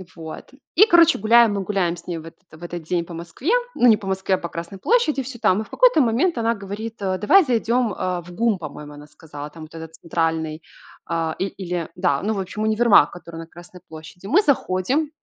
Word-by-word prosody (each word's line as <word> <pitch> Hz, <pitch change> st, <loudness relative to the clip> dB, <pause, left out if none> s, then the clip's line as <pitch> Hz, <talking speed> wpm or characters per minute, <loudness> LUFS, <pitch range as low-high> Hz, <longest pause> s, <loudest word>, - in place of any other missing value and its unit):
Вот. 160 Hz, +9 st, -10 dB, 0.2 s
И, 410 Hz, -, +8 dB
короче, 340 Hz, -5 st, +5 dB
гуляем, 225 Hz, +1 st, +5 dB
мы 200 Hz, -, -2 dB
гуляем 185 Hz, -4 st, -1 dB
с 170 Hz, -, -15 dB
ней 175 Hz, -2 st, -3 dB
в 160 Hz, -, -9 dB
этот 165 Hz, +4 st, -14 dB
в 155 Hz, +2 st, -14 dB
этот 175 Hz, -1 st, -6 dB
день 170 Hz, +1 st, -2 dB
по 170 Hz, -, -10 dB
Москве, 170 Hz, -, -4 dB, 0.2 s
ну, 245 Hz, -, +4 dB
не 220 Hz, -, +6 dB
по 195 Hz, -, -9 dB
Москве, 190 Hz, 0 st, 0 dB
а -, -, -3 dB
по 170 Hz, -, -6 dB
Красной 170 Hz, +4 st, -7 dB
площади 315 Hz, -, +1 dB
всё 245 Hz, -1 st, -9 dB
там, 185 Hz, +3 st, +3 dB
и -, -, -4 dB
в -, -, -17 dB
какой-то -, -, +4 dB
момент 255 Hz, +7 st, +1 dB
она 230 Hz, 0 st, +1 dB
говорит, 205 Hz, +2 st, -7 dB
э: 190 Hz, -1 st, -1 dB
"Давай 375 Hz, -, +5 dB
зайдем, 235 Hz, -2 st, +1 dB
а, 180 Hz, -1 st, -2 dB
в 175 Hz, +1 st, -13 dB
ГУМ",- 225 Hz, +2 st, +1 dB
по-моему, 150 Hz, -1 st, -9 dB
она 145 Hz, 0 st, -12 dB
сказала. 150 Hz, -2 st, -10 dB
Там 160 Hz, +1 st, -12 dB
вот 155 Hz, -, -13 dB
этот 160 Hz, 0 st, -9 dB
центральный, 160 Hz, -1 st, -2 dB, 0.5 s
а, 165 Hz, -1 st, -2 dB
и 190 Hz, -, 0 dB
или, 180 Hz, -4 st, -5 dB
да, 140 Hz, -1 st, 0 dB
ну, 215 Hz, +2 st, 0 dB
в 200 Hz, -, -3 dB
общем, 195 Hz, +3 st, -4 dB
универмаг, 220 Hz, 0 st, +4 dB
который 170 Hz, -2 st, -11 dB
на 165 Hz, -, -8 dB
Красной 175 Hz, +1 st, -14 dB
площади. 160 Hz, +4 st, -11 dB
Мы 335 Hz, -, +4 dB
заходим, 270 Hz, -, 0 dB
185 Hz, 230 wpm, -22 LUFS, 165-230 Hz, 0.5 s, И